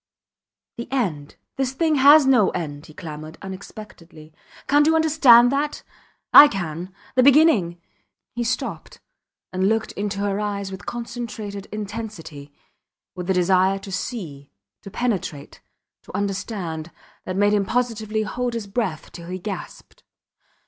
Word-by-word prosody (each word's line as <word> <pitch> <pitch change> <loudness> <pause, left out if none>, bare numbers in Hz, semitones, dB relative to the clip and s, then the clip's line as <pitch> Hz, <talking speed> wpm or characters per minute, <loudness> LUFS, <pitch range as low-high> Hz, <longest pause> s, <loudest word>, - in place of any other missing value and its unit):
The 235 +1 -7
end 170 - -2 0.2
this 265 -1 -1
thing 315 +1 +1
has 285 +2 +7
no 250 -7 +4
end, 150 -2 -6
he 155 - -14
clamoured, 155 -1 -8
unexpectedly. 185 -5 -11 0.3
Cant 290 +1 +4
you 320 - +4
understand 280 -7 +6
that? 290 +2 -2 0.5
I 295 - +11
can... 175 - -5 0.2
The 255 - +4
beginning... 255 - +4 0.5
He 240 - -2
stopped 235 - -4 0.5
and 190 +1 +1
looked 220 0 0
into 205 -1 -4
her 200 0 -1
eyes 200 -2 -3
with 190 +1 -9
concentrated 230 -4 -6
intensity, 205 -9 -7 0.6
with 180 0 -7
a - - +4
desire 185 +2 +3
to 195 0 -10
see, 175 - -6 0.3
to - - -10
penetrate, 195 -10 -3 0.4
to - - -7
understand, 190 -5 -4 0.4
that 185 0 -4
made 205 +1 +3
him 205 -1 +2
positively 220 -3 -1
hold 245 +2 -3
his 230 -3 -4
breath 195 -6 -3
till 170 -1 -10
he 180 +1 -4
gasped. 195 +1 -8
205 Hz, 135 wpm, -22 LUFS, 180-240 Hz, 0.6 s, I